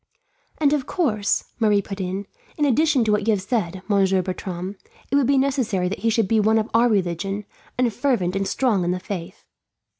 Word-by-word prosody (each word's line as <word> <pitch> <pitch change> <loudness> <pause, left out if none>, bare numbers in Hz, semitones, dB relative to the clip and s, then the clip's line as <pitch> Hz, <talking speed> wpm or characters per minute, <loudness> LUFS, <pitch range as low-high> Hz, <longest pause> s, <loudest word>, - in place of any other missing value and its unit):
"And 295 -2 +3
of 285 -4 -1
course," 215 - 0 0.2
Marie 210 -3 +3
put 195 0 -6
in, 190 +2 -3 0.3
"in 295 - +2
addition 285 -1 +3
to 220 - +1
what 210 0 +1
you 220 - +4
have 195 - -4
said, 190 -5 -2
Monsieur 195 -2 +2
Bertram, 185 +1 -5 0.4
it - - +2
would 280 -3 +3
be 275 0 +3
necessary 260 -9 +1
that 200 - -4
he 230 - +1
should 225 -2 +1
be 220 +2 +2
one 220 +1 +3
of 220 0 -1
our 235 +2 +4
religion, 195 0 -1 0.3
and 245 -3 +1
fervent 230 -9 0
and 195 0 -1
strong 225 -8 +1
in 175 - -1
the 180 +1 -1
faith." 185 -2 -7
210 Hz, 205 wpm, -23 LUFS, 190-245 Hz, 0.4 s, you